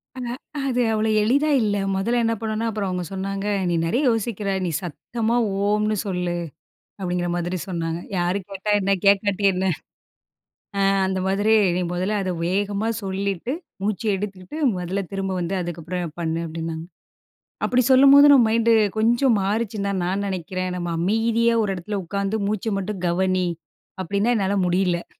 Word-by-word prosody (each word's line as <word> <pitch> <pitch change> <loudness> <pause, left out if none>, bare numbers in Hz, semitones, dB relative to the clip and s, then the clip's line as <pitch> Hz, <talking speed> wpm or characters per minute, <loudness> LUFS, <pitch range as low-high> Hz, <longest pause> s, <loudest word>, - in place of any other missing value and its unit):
அ - - -7 0.5
அது 250 -1 +1
அவ்வளோ 220 0 +1
எளிதா 285 +7 +2
இல்ல. 205 -1 +1 0.2
மொதல்ல 235 +5 +1
என்ன 230 - +2
பண்ணனுன்னா 220 +1 -2
அப்புறம் 205 -3 -2
அவங்க 180 -1 -2
சொன்னாங்க, 195 +1 -3 0.2
"நீ - - +1
நெறைய 240 - +1
யோசிக்கிற. 215 -2 -2 0.2
நீ - - -1
சத்தமா 225 +7 -2 0.3
ஓம்ன்னு 210 +1 +1
சொல்லு." 180 -2 -2 0.6
அப்பிடீங்கிற 180 -2 -2
மாதிரி 175 +1 -2
சொன்னாங்க. 165 -2 -2 0.2
"யாரு 175 +3 +1
கேட்டா 195 +2 -4
என்ன? 195 +1 +2
கேட்காட்டி 200 0 +3
என்ன? 185 +1 -2 1.2
ஆ - - +2 0.3
அந்த 190 0 -1
மாதிரி 205 +3 +2 0.2
நீ 180 - 0
முதல்ல 190 +4 -1
அதை 185 - -1
வேகமா 200 +3 0 0.2
சொல்லிட்டு, 195 +4 -2 0.3
மூச்சு 215 +2 -2
எடுத்துகிட்டு 195 +6 -6 0.2
முதல்ல, 180 +2 -2
திரும்ப 195 -1 -2
வந்து 180 +2 -2
அதுக்கப்புறம் 170 -1 -5
பண்ணு." 165 0 -1
அப்படின்னாங்க. 165 0 -5 0.8
அப்படி 250 0 +3
சொல்லும்போது, 275 +2 +8
நம்ம 255 -5 +7
மைண்டு 230 0 +3 0.2
கொஞ்சம் 235 +1 +3
மாறுச்சுன்னு 205 0 -1
தான், 190 -2 -1
நான் 195 +3 -1
நெனைக்கிறேன். 185 0 -3
நம்ம 175 -1 -3
"அமைதியா 225 +5 +2
ஒரு 200 - -1
இடத்துல 200 +4 -4
உட்காந்து 200 +3 -1
மூச்சை 215 +1 -1
மட்டும் 195 -1 -4
கவனி." 185 +1 +1 0.5
அப்படின்னா, 200 +6 0
என்னால 200 0 0
முடியல. 175 -1 0
195 Hz, 150 wpm, -23 LUFS, 180-220 Hz, 1.2 s, சொல்லும்போது